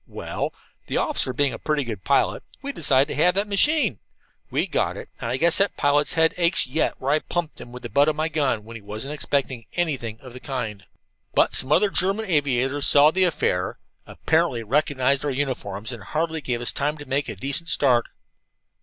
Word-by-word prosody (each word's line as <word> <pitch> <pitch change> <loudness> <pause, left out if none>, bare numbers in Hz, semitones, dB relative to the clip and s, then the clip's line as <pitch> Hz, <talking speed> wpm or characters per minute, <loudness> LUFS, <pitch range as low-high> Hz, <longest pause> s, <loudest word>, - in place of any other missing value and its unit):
Well, - - -4 0.4
the - - -2
officer 130 - 0
being 140 +2 0
a - - -7
pretty 150 -2 -1
good 110 -6 -6
pilot, 140 - +1 0.2
we 280 - -3
decided 140 - +3
to 150 - 0
have 180 +1 +4
that 200 +2 +1
machine. 220 - +2 0.5
We - - 0
got - - -1
it, - - -9
and 115 - -4
I 125 - 0
guess 170 +3 +6
that 200 +1 +1
pilot's 145 0 +2
head 160 0 +3
aches 175 +1 +3
yet 135 +6 -1
where 135 +2 -1
I 150 - +3
plumped 170 0 -4
him 120 - -11
with 125 0 -10
the - - -6
butt 140 +1 +4
of 155 - -1
my 155 +1 0
gun 145 -8 -1
when 115 +2 -11
he 115 - -8
wasn't 110 +8 -5
expecting 135 -5 -2
anything 130 -10 -2
of 130 -1 -12
the 125 - -9
kind. 115 -8 -5 0.5
"But - - +3
some 130 - +3
other 200 +6 +3
German 195 +5 0
aviators 140 - +1
saw 145 +1 +6
the 185 +2 +2
affair, 90 - -1 0.3
apparently 160 -8 0
recognized 140 +2 +1
our 145 - -1
uniforms, 125 -7 -3
and 120 -4 -8
hardly 160 - -2
gave 125 -3 -2
us 120 - 0
time 145 +2 -2
to 145 - -10
make 140 +1 -1
a - - -5
decent 140 +5 -2
start. 125 -4 +3
140 Hz, 205 wpm, -23 LUFS, 125-160 Hz, 0.5 s, guess